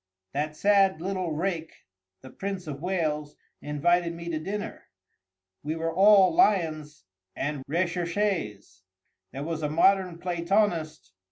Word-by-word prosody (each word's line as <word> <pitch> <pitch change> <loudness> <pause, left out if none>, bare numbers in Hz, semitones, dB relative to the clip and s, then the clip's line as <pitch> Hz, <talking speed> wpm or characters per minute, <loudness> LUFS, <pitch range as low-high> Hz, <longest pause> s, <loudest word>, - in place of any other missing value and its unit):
—That 150 +2 -2
sad 195 -2 +3
little 185 -1 -3
rake, 165 0 -4 0.4
the 130 - -12
Prince 195 -2 -5
of 145 -2 -6
Wales, 155 -5 -2 0.3
invited 170 +3 +1
me 170 0 -7
to 160 -2 -2
dinner. 200 +6 -5 0.8
We 155 +2 -3
were 165 0 -2
all 195 -1 +6
lions 155 - +1 0.3
and 145 -1 -3
recherchés. 170 - -2 0.5
There 135 - -6
was 160 0 -3
a 150 - -1
modern 180 +2 +3
Platonist. 175 - -1
170 Hz, 120 wpm, -27 LUFS, 155-190 Hz, 0.8 s, all